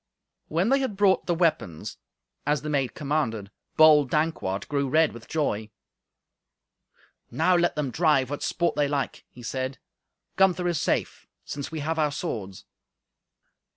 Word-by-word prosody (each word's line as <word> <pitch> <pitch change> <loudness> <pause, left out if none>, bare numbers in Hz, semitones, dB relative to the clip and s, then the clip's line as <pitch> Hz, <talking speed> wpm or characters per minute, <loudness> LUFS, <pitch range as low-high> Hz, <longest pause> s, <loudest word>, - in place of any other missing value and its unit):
When 170 +7 +1
they 275 +1 +4
had 260 -7 -2
brought 195 -2 +3
the 175 - +1
weapons, 155 - -1 0.4
as 150 0 0
the 150 - -3
maid 135 -4 0
commanded, 120 -9 -2 0.3
bold 150 -3 +7
Dankwart 150 -12 -1
grew 140 -2 -1
red 160 +3 +3
with 115 0 -12
joy. 110 -9 -1 1.6
"Now 165 +9 +2
let 175 0 +2
them 145 -4 -2
drive 145 -4 +2
what 145 - -4
sport 170 -1 0
they 145 -1 +2
like," 140 -1 -3
he 120 - -14
said; 130 +2 -3 0.6
"Gunther 185 -2 +3
is 170 -4 0
safe, - - -1 0.2
since 140 +1 -6
we 160 -2 -4
have 160 +2 -2
our 150 -1 +2
swords." 110 - -5
150 Hz, 150 wpm, -26 LUFS, 130-165 Hz, 1.6 s, bold